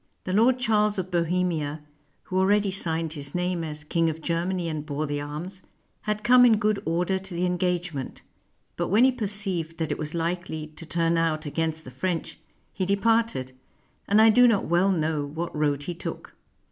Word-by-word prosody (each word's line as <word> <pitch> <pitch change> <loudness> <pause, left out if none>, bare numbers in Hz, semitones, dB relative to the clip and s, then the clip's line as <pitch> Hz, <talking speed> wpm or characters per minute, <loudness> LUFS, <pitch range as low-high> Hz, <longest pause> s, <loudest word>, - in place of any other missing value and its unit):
The 185 - -3
Lord 235 +5 +4
Charles 210 -4 +2
of 185 0 -3
Bohemia, 170 -3 0 0.4
who 185 - -1
already 200 +1 +3
signed 165 -4 -1
his 140 -1 -6
name 180 -1 -1
as 150 -1 -5
King 165 +2 +1
of 160 0 -4
Ger 170 +2 -1
many 185 -2 -2
and 155 -2 -3
bore 150 0 -3
the 145 -1 -3
arms, 165 +6 -6 0.5
had 210 0 -1
come 245 +1 +7
in 230 -3 +6
good 210 -1 +1
order 180 +3 0
to 190 -1 -8
the 175 +1 0
engagement; 180 -5 -2 0.5
but - - -1
when 215 +5 +4
he 260 - +6
perceived 195 -8 -3
that 160 -2 -2
it - - -2
was 155 +1 -3
likely 170 -2 -2
to 155 +1 -11
turn 165 0 +1
out 160 -1 0
against 160 +1 -2
the 130 - -10
French, 165 +6 -3 0.3
he 190 - -2
departed, 200 - +1 0.6
and 205 +2 +4
I 220 0 +7
do 245 +2 +6
not 220 -4 +2
well 175 +4 +3
know 155 -4 0
what 160 +4 -5
road 145 -2 0
he 175 - -4
took. 170 - -7
175 Hz, 190 wpm, -26 LUFS, 155-195 Hz, 0.6 s, come